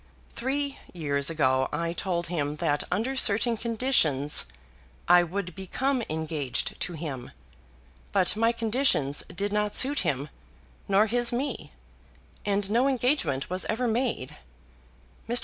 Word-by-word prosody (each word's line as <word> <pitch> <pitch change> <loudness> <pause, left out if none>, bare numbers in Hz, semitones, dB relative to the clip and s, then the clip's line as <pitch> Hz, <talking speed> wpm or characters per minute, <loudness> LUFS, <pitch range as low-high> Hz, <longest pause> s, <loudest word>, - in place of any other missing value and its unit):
Three 275 +3 -2 0.2
years 140 -3 +1
ago 130 -5 +1
I 165 +2 -2
told 175 -1 -2
him 150 -4 -2
that 150 -2 0
under 250 +6 -1
certain 230 -1 +3
conditions 215 - +2 0.6
I 175 - +7
would 180 +1 -4
become 255 +9 -1
engaged 155 -4 -2
to 180 - -3
him. 145 -6 -6 0.8
But 190 -1 +2
my 230 +2 +3
conditions 225 - +1
did 200 +3 -3
not 210 0 0
suit 280 +2 +5
him, 140 +1 -1 0.6
nor 200 +2 +4
his 240 +2 +1
me, 260 +4 -3 0.8
and 200 -1 +1
no 240 +4 +3
engagement 245 - 0
was 185 +1 0
ever 240 +3 -1
made. 240 +3 -1 0.9
Mr. 240 +1 +6
200 Hz, 130 wpm, -27 LUFS, 155-240 Hz, 0.9 s, I